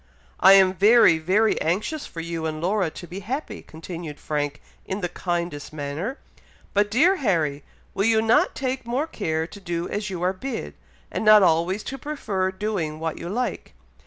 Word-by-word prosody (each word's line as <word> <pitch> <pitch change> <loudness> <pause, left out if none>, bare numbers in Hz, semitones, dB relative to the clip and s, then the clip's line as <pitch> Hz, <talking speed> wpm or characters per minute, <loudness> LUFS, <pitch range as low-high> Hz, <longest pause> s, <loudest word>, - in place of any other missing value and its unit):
"I 190 +1 +8
am 190 -1 +6
very 200 -3 +6
very 195 +7 +2
anxious 210 - -1
for 165 - -7
you 165 -1 -3
and 155 0 -4
Laura 185 +1 +1
to 175 - -10
be 180 +3 -7
happy," 255 +10 -5
continued 165 -1 -8
Frank, 145 -1 -2 0.2
in 190 +2 -4
the 175 - 0
kindest 170 -5 -3
manner; 155 - -4 0.6
"but, 205 0 +2
dear 335 - +4
Harry, 160 - 0 0.3
will 195 - 0
you 225 -1 +4
not 225 +1 +3
take 260 -2 -3
more 255 +6 0
care 160 - -2
to 200 +4 -11
do 175 -3 -3
as 210 0 -3
you 180 -2 -4
are 185 +1 +2
bid, 240 +5 -5 0.4
and - - -2
not 215 -1 +8
always 175 +4 +2
to 270 0 -6
prefer 210 -11 -2
doing 190 -6 -3
what 160 -1 -3
you 170 - -6
like! 245 +6 -3
190 Hz, 180 wpm, -24 LUFS, 165-220 Hz, 0.6 s, I